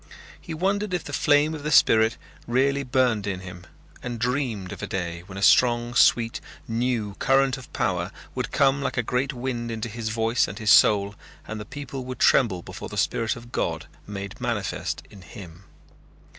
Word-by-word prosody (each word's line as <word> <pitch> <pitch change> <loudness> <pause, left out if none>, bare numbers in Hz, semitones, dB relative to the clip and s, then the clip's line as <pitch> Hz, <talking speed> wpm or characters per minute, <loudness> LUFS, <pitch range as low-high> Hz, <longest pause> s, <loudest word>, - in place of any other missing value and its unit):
He 165 - -6
wondered 195 +3 0
if 175 - -3
the 145 - -8
flame 145 +2 +3
of 155 - -6
the 150 - -3
spirit 115 -4 +5 0.3
really 135 +3 +2
burned 125 -5 +1
in 95 -2 -3
him 90 -1 -10 0.3
and 120 -1 -5
dreamed 120 -6 -2
of - - -8
a - - -4
day 85 -2 -4
when 95 -1 -9
a 100 - -3
strong 120 +1 +4
sweet 115 -1 +3 0.3
new 115 -3 -1
current 135 -1 +3
of 130 -2 -12
power 90 0 -1 0.2
would 125 -1 -3
come 140 0 +3
like 140 - -3
a 125 - +2
great 125 +4 -1
wind 120 -2 -4
into 115 0 -4
his 110 0 -4
voice 115 +1 +1
and 100 - -7
his 110 -2 +2
soul 100 -1 +5 0.3
and 110 0 -5
the 105 - -7
people 140 -1 -7
would 130 0 -6
tremble 95 -9 +3
before - - -8
the - - -7
spirit 115 -1 0
of 120 0 -12
God - - -2 0.2
made 100 -1 -7
manifest - - -3
in 100 - -13
him. 90 0 -12
120 Hz, 185 wpm, -25 LUFS, 105-135 Hz, 0.3 s, spirit